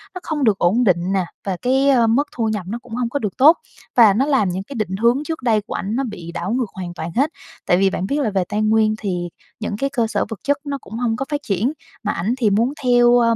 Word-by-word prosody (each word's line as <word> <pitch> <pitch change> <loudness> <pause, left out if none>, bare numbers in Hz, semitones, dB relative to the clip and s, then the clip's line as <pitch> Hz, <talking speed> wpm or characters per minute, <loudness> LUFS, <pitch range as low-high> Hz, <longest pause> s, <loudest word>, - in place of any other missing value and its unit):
Nó - - -4
không 300 -3 -2
được 210 -4 +3
ổn 215 +8 +2
định 180 -2 +2
nè 190 -2 +1 0.2
và 190 -2 -2
cái, 265 +2 +2
ờ, 240 -4 +4
mức 275 +6 +2
thu 225 -2 0
nhập 210 -4 -3
nó 235 +2 -3
cũng 240 -2 -8
hông 245 -2 -1
có 285 - -2
được 210 -5 -4
tốt. 310 +6 +7 0.4
Và 220 -5 +7
nó 260 +7 +2
làm 265 -10 +2
những 185 +2 -3
cái 275 - -10
định 195 -4 -2
hướng 235 +7 +2
trước 320 -4 -5
đây 220 -3 +2
của - - -8
ảnh 205 +4 -3
nó 270 - 0
bị 175 -8 -7
đảo 175 +3 -4
ngược 245 -5 -1
hoàn 180 -2 -6
toàn 165 0 -5
hết. 280 +5 +2 0.4
Tại 175 - +3
vì 195 0 +3
bạn 190 - -3
biết 290 +2 0
là 220 - +1
về 190 -2 0
Tây 210 +1 -1
Nguyên 215 0 +3
thì 180 -4 -3 0.3
những 215 -1 -3
cái 275 +3 -1
cơ 235 -5 0
sở - - -1
vật 225 - -6
chất 285 -1 +1
nó 280 -1 -3
cũng 210 - -13
hông 235 -2 0
có 270 - -3
phát 290 0 -2
triển, 215 - 0 0.3
mà 210 - 0
ảnh 195 +8 -1
thì 225 -5 +2
muốn 230 +7 +1
theo, 245 -1 +5
ờ, 230 -1 +3
225 Hz, 285 wpm, -20 LUFS, 195-255 Hz, 0.4 s, tốt